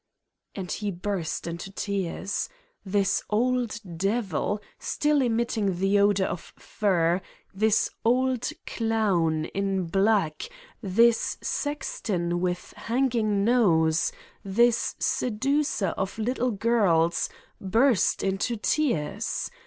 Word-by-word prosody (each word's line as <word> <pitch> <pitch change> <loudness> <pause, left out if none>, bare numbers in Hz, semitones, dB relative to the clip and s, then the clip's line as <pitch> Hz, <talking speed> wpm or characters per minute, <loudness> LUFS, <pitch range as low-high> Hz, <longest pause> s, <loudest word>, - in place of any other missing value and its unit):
And 185 -3 -5
he 210 -1 -2
burst 185 -2 -3
into 170 +3 -5
tears. 195 0 -3 0.3
This 195 -1 +1
old 240 +1 +1 0.2
devil, 200 0 -1 0.2
still 295 -1 +1
emitting 225 -5 0
the 195 +2 +2
odor 200 -1 +3
of 175 -2 -6
fur, 180 -3 +1 0.3
this 215 +2 +2 0.2
old 255 +2 +2 0.2
clown 195 -9 +1
in 195 -2 0
black, 195 - +1 0.3
this 230 +3 +3
sexton 185 - -2
with 180 -1 -2
hanging 230 -5 0
nose, 170 - +3 0.3
this 230 +4 +2
seducer 260 - 0
of 195 +2 -3
little 250 +3 0
girls 195 -7 +2 0.3
burst 225 +4 +2
into 195 +5 0
tears 230 - -1
205 Hz, 100 wpm, -26 LUFS, 185-235 Hz, 0.3 s, odor